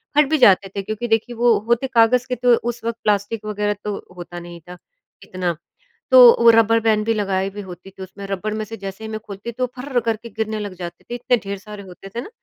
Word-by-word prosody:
फट 300 0 +6
भी 315 - +2
जाते 200 -7 +5
थे 200 - -1
क्योंकि 215 +4 -4
देखिए 225 +2 0
वो 235 -1 +4
होते 235 +3 +1
कागज़ 245 0 +3
के 250 - -2
थे। - - -19
तो 245 -1 +5 0.2
उस 240 -1 -6
वक्त 230 0 -2
प्लास्टिक 210 +1 0
वग़ैरह 210 0 -1
तो 210 -1 -3 0.2
होता 175 0 -8
नहीं 175 0 -10
था 180 - -9 0.5
इतना। 180 -2 -3 0.6
तो 260 - +9 0.2
वो 235 - +8
रबर 230 0 +4
बैन 220 -1 +2
भी 225 +1 +1
लगाई 195 -2 -1
भी 205 +1 -8
होती 185 -1 -11
थी, 190 0 -10
उसमें 190 +2 -10
रबर 200 +2 -3
में 215 0 -3
से 225 +2 -8
जैसे 195 +1 -8
ही - - -5
मैं 215 - -4
खोलती 210 +1 -8
तो 250 +2 -2
फर्र 255 0 -1
करके 230 0 -3
गिरने 220 0 -3
लग 205 -2 -5
जाते 175 -1 -8
थे, 240 - -6
इतने 245 0 +1
ढेर 200 0 -4
सारे 210 +1 -10
होते 190 +1 -12
थे 235 - -2
ना। 275 - -9
215 Hz, 245 wpm, -21 LUFS, 195-235 Hz, 0.6 s, तो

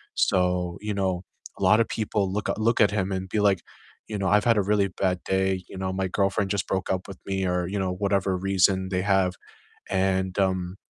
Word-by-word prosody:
So, 90 -1 +1
you 105 0 -3
know, 95 -2 -1 0.3
a - - -5
lotta 110 +1 +5
people 105 -3 -1
look 105 +1 -2
a - - -1
look 115 +1 +2
at 100 -2 +5
him 100 -2 -1
and 95 0 -4
be 105 - 0
like, 100 -3 +3 0.5
you 105 - -4
know, 95 -1 -1
"I've 105 +3 +3
had 115 -2 +4
a - - +4
really 100 0 +1
bad 90 -1 -1
day," 95 -1 0
you 95 - -9
know, 95 0 -2
"My 95 0 -1
girlfriend 100 +1 0
just 100 -2 -1
broke 95 0 -1
up 95 0 -2
with 95 - -9
me," 95 -1 -1
or, 90 -1 0
you 100 +1 -2
know, 95 -1 -1
whatever 100 -1 0
reason 95 0 +2
they 95 -1 0
have. 95 -2 +2 0.6
And, 95 0 0
um, 95 -1 0
95 Hz, 220 wpm, -25 LUFS, 95-100 Hz, 0.6 s, lotta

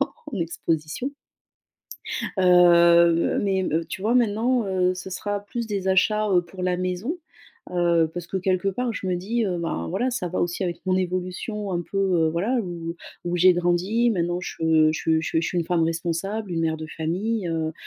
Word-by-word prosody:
en 275 - +1 0.2
en 205 - -3
exposition 165 - -2 1.3
heu, 170 -2 +5
mais 190 -2 +1
me 165 -1 -1
tu - - -7
vois, 220 +4 +1
maintenant, 235 +1 +2
heu, 185 -1 +1
ce 185 +1 -7
sera 205 +2 -3
plus 230 +3 -5
des 195 -3 -3
achats, 210 +3 +2
heu, 180 -2 +4
pour 180 +1 -8
la 180 -1 0
maison, 185 - -2 0.5
heu, 170 -2 +2
parce 175 -1 -6
que 190 - -2
quelque 185 +1 0
part, 240 +4 -2
je 195 - -4
me 180 - +1
dis, 220 +7 -1
heu: 180 -2 -1
«Ben, 125 - -3
voilà, 250 - 0
ça 210 -8 -2
va 180 - -3
aussi 175 +2 -1
avec 175 -2 -2
mon 185 0 +2
évolution 185 +3 -3
un 175 - 0
peu», 195 - -6
heu, 180 -5 +2
voilà, 195 +11 0
où 170 -3 -5 0.3
où 175 0 -1
j'ai 180 +1 +6
grandi 175 +7 +1
maintenant, 175 -3 -1
je 160 -2 +2
je 160 0 +1
je 160 - 0
je 165 - -1
suis 180 - -2
une 170 - 0
femme 170 -1 +1
responsable, 170 +5 -2
une 165 -1 -1
mère 160 -1 0
de 155 - -7
famille, 185 +6 -1
heu 160 -1 -2
180 Hz, 195 wpm, -24 LUFS, 170-200 Hz, 1.3 s, j'ai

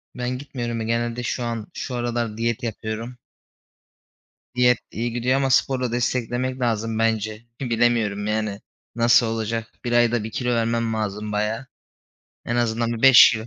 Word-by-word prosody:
Ben 125 0 -2
gitmiyorum. 120 -4 -4
Ya, - - -3
genelde 120 +1 -1
şu 120 +1 -2
an 115 -2 -3
şu 130 - -5
aralar 120 -2 -2
diyet 115 0 -1
yapıyorum. 115 +2 -4 1.4
Diyet 125 -1 +4
iyi 120 +2 -2
gidiyor 125 +2 +1
ama 135 -1 +1
sporla 130 -1 +2
desteklemek 125 +1 -1
lazım 115 -1 0
bence. 110 -1 0 0.2
Bilemiyorum, 115 -4 +1
yani, 105 -2 -1 0.4
nasıl 120 +1 +5
olacak? 115 0 -2 0.2
1 120 - -1
ayda 120 -1 +3
1 110 - -6
kilo 125 -1 -2
vermem 115 0 0
lazım 105 -1 -3
bayağı. 105 +4 -1 0.8
En 120 - -1
azından 115 0 0
bir 115 - -5
5 135 -1 +9
kilo. 110 0 -4
115 Hz, 150 wpm, -23 LUFS, 110-120 Hz, 1.4 s, 5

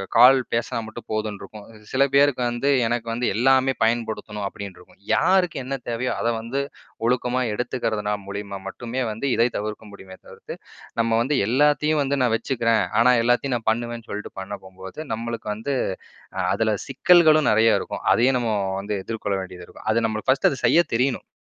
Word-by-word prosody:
கால் 125 +3 +8 0.2
பேசுனா 115 0 -1
மட்டும் 110 +1 -10
போதுன்னு 110 -2 -2
இருக்கும். 105 -1 -11 0.3
சில 135 +1 +3
பேருக்கு 140 -2 +4
வந்து 120 +4 -1 0.2
"எனக்கு 120 0 -2
வந்து 120 +2 -2
எல்லாமே 130 +2 +3
பயன்படுத்தணும்" 110 -3 -1
அப்டின்ருக்கும். 100 -3 -10
யாருக்கு 180 -2 +2
என்ன 135 +2 -3
தேவையோ 120 +2 -1
அத 115 - -1
வந்து 125 +5 -3 0.5
ஒழுக்கமா 125 +1 +1
எடுத்துக்கிறதுனா, 110 -3 -2
மூலியமா 100 0 -6
மட்டுமே 120 +5 -4
வந்து 115 +6 -3
இதை 115 +1 +3
தவிர்க்க 105 +1 -5
முடியுமே 95 -1 -12
தவிர்த்து - - -10 0.5
நம்ம 115 0 +1
வந்து 135 +3 0
"எல்லாத்தையும் 150 +4 +2
வந்து 140 +1 -1
நான் 120 -3 +2
வச்சுக்குறேன். 115 -2 +1 0.2
ஆனா, 125 +2 +6
எல்லாத்தையும் 120 +2 +1
நான் 110 -1 -2
பண்ணுவேன்" 120 0 -4
சொல்ட்டு 105 +1 -6
பண்ண 100 +2 -6
போம்போது, 95 +6 -11
நம்மளுக்கு 115 -1 -5
வந்து 135 +6 -3 0.8
அதுல 110 -1 +1 0.2
சிக்கல்களும் 155 +1 +5
நெறைய 110 +1 +4
இருக்கும். - - -6
அதையும் 125 +2 +3
நம்ம 115 -2 -1 0.3
வந்து 105 +1 -3
எதிர்கொள்ள 105 -3 -2
வேண்டியதுருக்கும். 90 +2 -11
அது 115 0 +1
நம்மளுக்கு 110 +3 -4
ஃபர்ஸ்ட்டு 135 +2 +3
அத 130 - -5
செய்ய 170 - +5
தெரியணும். 125 0 0
115 Hz, 160 wpm, -23 LUFS, 110-130 Hz, 0.8 s, கால்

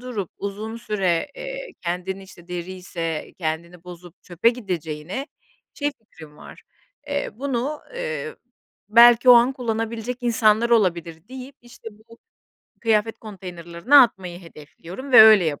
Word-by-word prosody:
durup 235 -8 -5
uzun 210 +3 -6
süre, 195 -7 -1
eee, - - -7
kendini, 180 +3 -4
işte, 180 -2 -16
deriyse 175 -2 -5
kendini 170 +1 -5
bozup 175 -1 -13
çöpe 180 +5 +1
gideceğine 180 - -5 0.5
şey 290 -1 -2
fikrim 160 -9 -16
var, - - -14 0.4
eee, 285 0 -3
bunu, 270 +4 -3 0.2
ııı, 480 -1 -5 0.5
belki 240 +3 +6
o - - +11
an 240 +2 +5
kullanabilecek 230 -1 -4
insanlar 230 -1 +2
olabilir 170 -5 0
deyip, 260 +1 -10
işte 240 -1 -12
bu 225 +2 -20 0.6
kıyafet 225 -1 0
konteynerlerine 180 - -5
atmayı 190 -9 +3
hedefliyorum 170 - -11
ve - - +10
öyle 215 -4 +7
yap 150 -3 -2
210 Hz, 125 wpm, -22 LUFS, 175-240 Hz, 0.6 s, o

